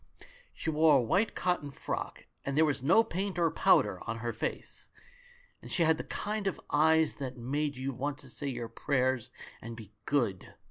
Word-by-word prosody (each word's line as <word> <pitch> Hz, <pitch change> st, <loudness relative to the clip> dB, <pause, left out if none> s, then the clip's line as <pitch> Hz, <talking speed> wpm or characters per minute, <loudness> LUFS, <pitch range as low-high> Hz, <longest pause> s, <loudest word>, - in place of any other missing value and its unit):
She 160 Hz, -, -3 dB
wore 155 Hz, -1 st, +5 dB
a -, -, +3 dB
white 190 Hz, -, +1 dB
cotton 175 Hz, -5 st, 0 dB
frock, 140 Hz, -, -5 dB, 0.2 s
and 140 Hz, +1 st, -2 dB
there 160 Hz, -, +6 dB
was 140 Hz, -3 st, 0 dB
no 170 Hz, -, +5 dB
paint 190 Hz, -1 st, -3 dB
or 170 Hz, -2 st, +3 dB
powder -, -, +3 dB
on 115 Hz, -, -2 dB
her 120 Hz, 0 st, -3 dB
face, 110 Hz, -, -5 dB, 0.7 s
and -, -, -10 dB
she 175 Hz, -, +2 dB
had 160 Hz, -1 st, +3 dB
the -, -, -2 dB
kind 210 Hz, -1 st, -3 dB
of 195 Hz, -, -2 dB
eyes 160 Hz, +1 st, +4 dB
that 130 Hz, -2 st, -5 dB
make 145 Hz, +4 st, -1 dB
you 135 Hz, +1 st, -3 dB
want 140 Hz, +3 st, -3 dB
to 135 Hz, -, -11 dB
say 145 Hz, -, -4 dB
your 120 Hz, -3 st, -3 dB
prayers 130 Hz, +1 st, 0 dB, 0.3 s
and 115 Hz, +1 st, -7 dB
be 110 Hz, -2 st, -11 dB
good. 115 Hz, -10 st, 0 dB
145 Hz, 190 wpm, -31 LUFS, 125-160 Hz, 0.7 s, there